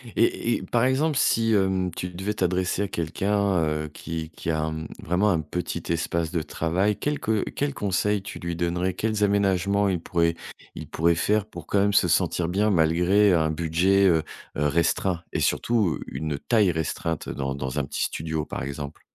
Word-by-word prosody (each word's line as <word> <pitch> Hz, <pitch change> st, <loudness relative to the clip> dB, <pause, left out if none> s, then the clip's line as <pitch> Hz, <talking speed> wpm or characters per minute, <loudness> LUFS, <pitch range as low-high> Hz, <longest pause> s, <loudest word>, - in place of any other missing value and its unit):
Et 115 Hz, 0 st, +2 dB
et -, -, -7 dB
par 120 Hz, -1 st, +1 dB
exemple, 140 Hz, +3 st, +1 dB
si 115 Hz, -2 st, +3 dB
hem, 95 Hz, -2 st, +1 dB
tu 90 Hz, -, -4 dB
devais 95 Hz, +4 st, -3 dB
t'adresser 90 Hz, 0 st, 0 dB
à 100 Hz, -, -1 dB
quelqu'un, 95 Hz, +3 st, 0 dB
heu, 75 Hz, 0 st, -1 dB
qui 80 Hz, -1 st, -5 dB
qui 80 Hz, -, -6 dB
a 80 Hz, 0 st, 0 dB
mmh, 80 Hz, 0 st, -5 dB, 0.2 s
vraiment 90 Hz, +6 st, +2 dB
un 85 Hz, -4 st, +2 dB
petit 85 Hz, +2 st, -4 dB
espace 85 Hz, 0 st, -1 dB
de 85 Hz, -3 st, 0 dB
travail. 90 Hz, +7 st, 0 dB
Quels 150 Hz, 0 st, -2 dB
que 110 Hz, -1 st, 0 dB
quels 145 Hz, -1 st, -2 dB
conseils 100 Hz, +1 st, 0 dB
tu -, -, -7 dB
lui 85 Hz, 0 st, -4 dB
donnerais? 90 Hz, +2 st, -1 dB
Quels 110 Hz, +1 st, -1 dB
aménagements 100 Hz, 0 st, +2 dB
il 90 Hz, -3 st, 0 dB
pourrait 85 Hz, 0 st, +1 dB, 0.4 s
il -, -, -7 dB
pourrait 85 Hz, +1 st, +2 dB
faire 105 Hz, +4 st, +1 dB
pour 110 Hz, -, -10 dB
quand 100 Hz, -, +2 dB
même 100 Hz, 0 st, +2 dB
se 90 Hz, -, +4 dB
sentir 85 Hz, 0 st, +1 dB
bien 100 Hz, +4 st, +1 dB
malgré 90 Hz, +3 st, +4 dB
un 80 Hz, -2 st, +2 dB
budget, 85 Hz, +5 st, +2 dB
heu, 80 Hz, -3 st, +3 dB, 0.3 s
heu 75 Hz, -, +1 dB
restreint? 85 Hz, +3 st, +1 dB
Et -, -, 0 dB
surtout 110 Hz, -8 st, +1 dB
une 75 Hz, +1 st, -4 dB
taille 105 Hz, -, +3 dB
restreinte 80 Hz, 0 st, -3 dB
dans 70 Hz, 0 st, -3 dB
dans 65 Hz, +1 st, -3 dB
un -, -, 0 dB
petit -, -, -2 dB
studio 80 Hz, -1 st, -2 dB
par -, -, -5 dB
exemple? 70 Hz, +2 st, -6 dB
90 Hz, 190 wpm, -25 LUFS, 80-100 Hz, 0.4 s, se